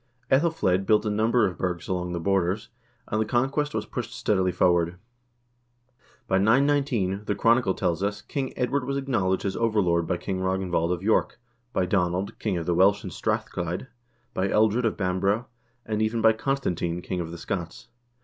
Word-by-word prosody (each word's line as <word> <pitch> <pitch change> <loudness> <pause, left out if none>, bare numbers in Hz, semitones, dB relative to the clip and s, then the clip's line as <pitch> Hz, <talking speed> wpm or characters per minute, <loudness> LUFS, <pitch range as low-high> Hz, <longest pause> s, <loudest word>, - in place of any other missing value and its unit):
iEthelflsed 130 - +2
built 105 0 +4
a 105 - 0
number 110 +2 +3
of 95 -3 -3
burghs 90 -2 -2
along 90 -1 -2
the 85 - -2
borders, 95 +3 0 0.4
and 110 - 0
the - - +1
conquest 135 +6 0
was 110 -1 -1
pushed 120 +2 -5
steadily 95 -3 +1
forward. 85 -1 +2 1.3
By 95 - +2
919, 115 -4 +2
the 105 - -1
chronicle 115 -2 +3
tells 90 -1 -1
us, 100 +1 -2
King 135 -2 -3
Edward 130 +2 0
was 140 +1 -2
acknowledged 105 -10 0
as 95 - -1
overlord 95 -7 +1
by 90 - 0
King 95 +1 -3
Ragn 95 0 -1
vald 85 0 +1
of 90 0 -2
York, 110 +2 +1 0.3
by 95 - +1
Donald, 90 +1 -1
king 100 -5 -1
of 85 - -3
the 90 - +1
Welsh 95 +3 +4
in - - -6
Strathchlyde, 90 +8 -3 0.4
by 95 -5 0
Ealdred 110 +4 +2
of 115 - 0
Bamborough, 100 +4 0 0.4
and 110 0 -1
even 110 +1 0
by 110 0 +5
Constantine, 90 -9 -2
king 90 - -3
of 80 - -5
the 85 - -7
Scots. 90 +8 -5
100 Hz, 180 wpm, -26 LUFS, 90-115 Hz, 1.3 s, by